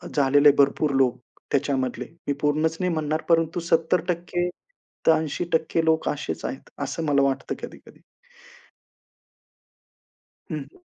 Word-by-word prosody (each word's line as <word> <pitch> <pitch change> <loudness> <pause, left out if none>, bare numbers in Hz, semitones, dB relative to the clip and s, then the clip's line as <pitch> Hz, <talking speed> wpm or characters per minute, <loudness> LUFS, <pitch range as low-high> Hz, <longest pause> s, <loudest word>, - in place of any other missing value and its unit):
झालेले, 145 +1 +6
भरपूर 140 +1 +3
लोक 125 -2 +2 0.3
त्याच्यामधले, 130 -3 0 0.2
मी 145 - +2
पूर्णच 155 +2 +1
नाही 180 -1 0
म्हणणार, 155 0 -1
परंतु 165 0 +2
70% 175 +1 +1 0.6
तर - - +9
80% 160 +1 -1
लोक 160 0 +2
असेच 80 - -4
आहेत, - - -6
असं 165 - -3
मला 140 -2 +3
वाटतं 135 -1 -1
कधी-कधी. - - -11 2.5
हं, 155 - -2 0.2
हं. - - -23
155 Hz, 115 wpm, -24 LUFS, 140-165 Hz, 2.5 s, तर